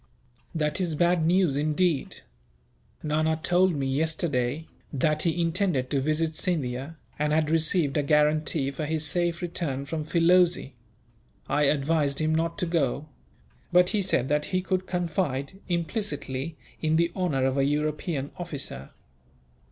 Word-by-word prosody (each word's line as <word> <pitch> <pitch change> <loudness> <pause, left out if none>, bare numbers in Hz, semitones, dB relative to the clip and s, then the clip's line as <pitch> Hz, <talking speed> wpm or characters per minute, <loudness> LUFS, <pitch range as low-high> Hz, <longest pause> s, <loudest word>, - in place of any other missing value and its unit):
"That 150 +2 0
is 170 -4 0
bad 175 0 +2
news, 175 -4 +3
indeed. 155 +1 0 0.8
Nana 155 +1 +1
told 180 0 +3
me, 140 -1 -1
yesterday, 145 -1 -1 0.3
that 155 +2 +1
he 170 0 0
intended 165 -6 0
to 140 -2 +1
visit 155 +2 0
Scindia, 145 -3 -2 0.2
and 150 0 +1
had 155 0 +2
received 160 -2 +1
a - - +3
guarantee 150 -1 +2
for 150 +2 -4
his 160 0 -1
safe 175 +2 -1
return, 145 -6 -2
from 155 +2 -3
Filoze. 170 -1 +3 0.8
I 150 - +1
advised 145 0 +1
him 155 0 +1
not 165 +3 0
to 195 - 0
go; 150 -3 -1 0.6
but 180 +1 +5
he 210 - +1
said 135 -9 +1
that 150 0 +1
he 185 -1 -1
could 185 0 -1
confide, 175 -3 -2
implicitly, 165 - -2 0.2
in 155 0 +2
the 170 +1 +2
honour 150 -9 0
of 135 +1 +1
a - - +3
European 150 0 -1
officer. 145 - -6
155 Hz, 145 wpm, -26 LUFS, 145-175 Hz, 0.8 s, but